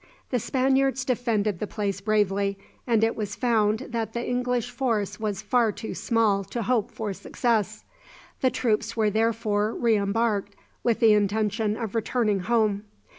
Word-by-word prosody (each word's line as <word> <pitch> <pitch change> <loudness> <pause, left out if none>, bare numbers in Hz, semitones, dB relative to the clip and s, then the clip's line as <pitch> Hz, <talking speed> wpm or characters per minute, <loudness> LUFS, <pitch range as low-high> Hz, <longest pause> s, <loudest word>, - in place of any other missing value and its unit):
The 250 - +1
Spaniards 265 +1 +1
defended 220 -6 0
the 210 - -3
place 200 -2 -3
bravely, 200 -1 +1 0.3
and 225 -2 +3
it 225 - +2
was 210 -2 -4
found 220 -3 +2
that 225 -2 -3
the 235 0 -3
English 245 -1 -1
force 210 -6 -1
was 210 -2 -3
far 240 -4 +2
too 220 - -6
small 215 -4 +1
to 235 +3 -4
hope 235 0 +1
for 220 -3 -4
success. 215 0 -1 0.6
The 260 - +3
troops 230 -2 -1
were 215 -2 +2
therefore 220 -1 0
re 230 -2 +2
embarked 205 0 0 0.3
with 235 0 +1
the 225 -2 +7
intention 210 +1 +1
of 225 -4 -4
returning 225 -2 +1
home. 215 0 +1
220 Hz, 155 wpm, -26 LUFS, 205-235 Hz, 0.6 s, the